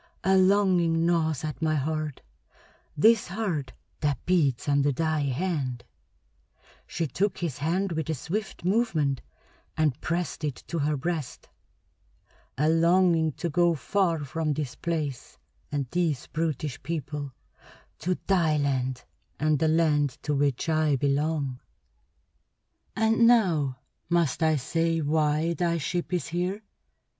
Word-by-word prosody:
A 190 0 +4
longing 185 -4 +3
gnaws 160 -4 +1
at 155 0 -5
my 155 -1 +1
heart 155 0 -2 0.8
this 220 +7 +5
heart 175 -9 -3 0.3
that 145 -4 -1
beats 150 -10 +1
under 140 0 +3
thy 155 +2 0
hand" 140 -3 -2 1.0
she 165 - -2
took 190 +8 -1
his 165 -8 -3
hand 180 +6 0
with 160 -1 -3
a 160 - 0
swift 185 - -4
movement 175 - +1 0.6
and 150 -3 +1
pressed 170 -2 -2
it 145 -4 -1
to 170 - -2
her 150 0 0
breast 155 -1 -4 1.1
"a 150 +3 +2
longing 165 -1 +3
to 170 - -3
go 170 +1 +2
far 165 -1 0
from 155 +2 -1
this 140 -4 -3
place 150 -6 -4 0.3
and 145 -2 -1
these 165 -7 0
brutish 155 -4 -3
people, 145 -4 -4 0.7
to 180 +2 -1
thy 170 -6 +2
land 130 -3 -1 0.4
and 155 -1 +2
the 160 - +2
land 150 -4 +2
to 150 - -1
which 140 -1 0
I 155 -2 +2
belong. 140 -1 0 1.4
"And 225 +1 +4
now 165 - +3 0.3
must 170 -3 +1
I 160 -1 +4
say 165 +4 0
why 155 +2 +1
thy 170 -1 0
ship 175 +3 -3
is 175 -5 -1
here? 180 +5 -2
160 Hz, 130 wpm, -27 LUFS, 145-175 Hz, 1.4 s, this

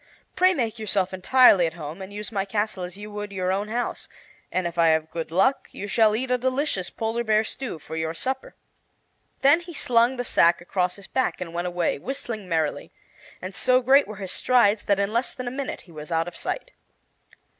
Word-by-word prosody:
"Pray 370 +1 +5
make 230 -6 -2
yourself 195 -3 0
entirely 185 -2 +5
at 160 - -6
home, 160 +2 -7
and 190 +1 -8
use 210 +3 -6
my 195 -3 0
castle 205 -1 -2
as 180 +2 -7
you 210 +1 -9
would 205 0 -5
your 185 -1 -1
own 200 +2 -1
house, 240 +3 -3 0.4
and 185 -1 -1
if 170 -1 -3
I 170 -1 +4
have 160 0 +2
good 165 -2 -4
luck 195 +11 +2
you 205 - -6
shall 215 0 +3
eat 250 +3 -2
a 250 - +2
delicious 255 -7 -1
polar 225 +1 -2
bear 215 -1 +3
stew 240 -3 -5
for 160 +1 -9
your 160 0 -2
supper." 265 +7 -4 0.9
Then 285 +5 +6
he 345 -1 -10
slung 240 0 +2
the 245 - -2
sack 170 -5 +4
across 180 +1 -1
his 200 - -12
back 260 - -1
and 170 -2 -6
went 175 +1 -2
away, 175 -4 -1
whistling 225 - -5
merrily. 160 -3 -1 0.5
And 185 +1 -5
so 255 +6 +3
great 275 +3 +5
were 210 - -7
his 190 -2 -5
strides 220 -4 +3
that 200 -1 +2
in 200 +2 0
less 235 +3 -1
than 255 - -6
a - - -2
minute 275 +1 -4
he 175 - -18
was 155 +1 -9
out 165 0 +1
of 175 - -8
sight. - - -4
205 Hz, 215 wpm, -25 LUFS, 175-245 Hz, 0.9 s, Then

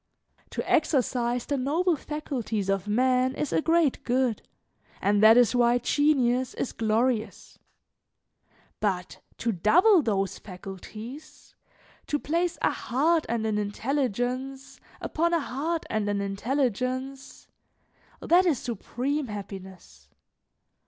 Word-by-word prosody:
To - - -4
exercise 250 -5 +1
the 285 - -1
noble 320 +7 +1
faculties 255 -10 -4
of 195 0 0
man 255 +4 +2
is 300 - -2
a - - +2
great 325 -3 +2
good, 250 -3 0 0.6
and 205 +1 +2
that 220 +2 +8
is 245 -2 +5
why 240 0 +4
genius 255 -1 +1
is - - -3
glorious; 225 +1 -1 1.2
but 185 -4 -2 0.2
to 230 - -1
double 340 - +5
those 195 -6 -1
faculties, 215 - -10 0.5
to 295 - 0
place 335 +4 -1
a - - +4
heart 315 +6 +1
and 230 -1 -1
an 215 -1 0
intelligence 260 +4 -2 0.2
upon 340 +2 0
a - - +2
heart 310 +4 -3
and 215 -2 -1
an 205 -1 0
intelligence 255 +5 -2 0.7
that 360 +2 +4
is 310 -6 +2
supreme 255 +5 -3
happiness. 190 - -9
250 Hz, 115 wpm, -27 LUFS, 215-285 Hz, 1.2 s, that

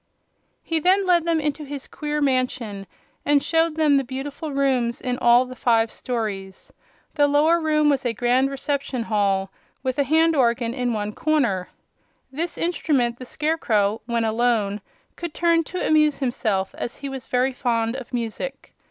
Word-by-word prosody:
He 325 -1 0
then 380 +4 +3
led 345 -2 +3
them 335 -1 +2
into 295 0 -2
his 285 -2 -7
queer 300 0 -3
mansion 255 -7 -1 0.4
and 290 -1 +3
showed 325 -1 +1
them 305 -3 +4
the 275 - +1
beautiful 270 +4 -6
rooms 260 -3 +1
in 250 -1 -3
all 240 +1 +5
the 255 0 -9
five 230 -3 +2
stories. 205 -6 -5 0.4
The 290 -2 +3
lower 310 +4 +3
room 305 -1 +2
was 280 -2 +2
a 245 - 0
grand 245 +4 +2
reception 275 -2 -2
hall, 200 -3 0 0.3
with 260 +1 -2
a - - +5
hand 320 +4 +3
organ 235 -3 +1
in 250 -2 -1
one 210 -1 -3
corner. 240 -14 0 0.6
This 315 +3 -3
instrument 275 -8 0
the 255 - -7
Scarecrow, 225 -10 0
when 235 -1 0
alone, 220 -3 +1 0.4
could 340 -3 -6
turn 335 -1 +3
to 365 - -4
amuse 305 -2 +4
himself, 220 -7 -1
as 235 - -4
he 280 - -6
was 270 -2 -7
very 255 +1 +1
fond 230 -2 0
of 265 -2 -8
music. 240 - -5
260 Hz, 165 wpm, -23 LUFS, 235-300 Hz, 0.6 s, all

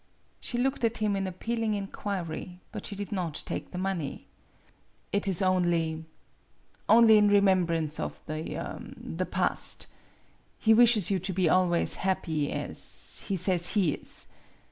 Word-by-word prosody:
She 240 - -3
looked 260 +1 0
at 230 0 +1
him 210 -2 0
in 195 -1 -2
appealing 225 +4 -2
inquiry, 185 -3 -5
but - - -6
she 205 - -6
did 200 -1 -6
not 175 -6 -3
take - - -5
the 180 - -8
money. 185 -6 -3 0.9
"It 200 0 0
is 190 -1 +2
only 170 -3 +1 0.8
only 225 -1 +7
in 210 - +4
remembrance 180 -6 +2
of 75 0 -4
the 155 +1 -5 0.2
the - - -4
past. - - 0 0.7
He 220 - +4
wishes 220 -5 +5
you 195 - +1
to 190 +2 -3
be 180 -1 +1
always 175 0 +2
happy 165 -6 -1
as - - 0
he 195 - 0
says 180 -1 +3
he 185 -9 +2
is. - - -2
190 Hz, 145 wpm, -28 LUFS, 170-205 Hz, 0.9 s, only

